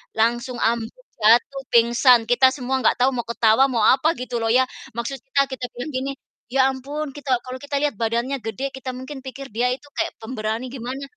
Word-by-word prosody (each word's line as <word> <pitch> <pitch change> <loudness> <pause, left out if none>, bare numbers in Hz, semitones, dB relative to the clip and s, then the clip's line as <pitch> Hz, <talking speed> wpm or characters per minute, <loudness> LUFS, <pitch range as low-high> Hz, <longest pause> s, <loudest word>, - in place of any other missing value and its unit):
langsung 240 +3 +1
ambruk, 235 - -1
jatuh, 235 +5 +4
pingsan, 235 +1 +5
kita 245 +3 +5
semua 265 0 -1
nggak 225 - +3
tahu 260 - +5
mau 240 -2 -3
ketawa 235 +2 +4
mau 235 -4 0
apa 300 +5 +4
gitu 245 -1 -3
loh 225 - 0
ya, 255 +3 +5 0.3
maksud 240 +3 -3
kita, 275 +1 +2
kita 255 -1 -4
bilang 245 +5 -5
gini, 260 +2 -2 0.4
"Ya 265 +1 +3
ampun, 285 +3 -5
kita" 280 -3 0
kalau 255 0 -6
kita 285 0 -5
lihat 295 - +1
badannya 235 +4 -1
gede 245 +5 -4
kita 265 -1 -6
mungkin 260 +2 -7
pikir 270 0 -9
dia 245 +3 +1
itu 255 - -20
kayak 335 +1 -2
pemberani 225 +1 -3
gimana, 260 +2 -5
255 Hz, 195 wpm, -22 LUFS, 235-270 Hz, 0.4 s, pingsan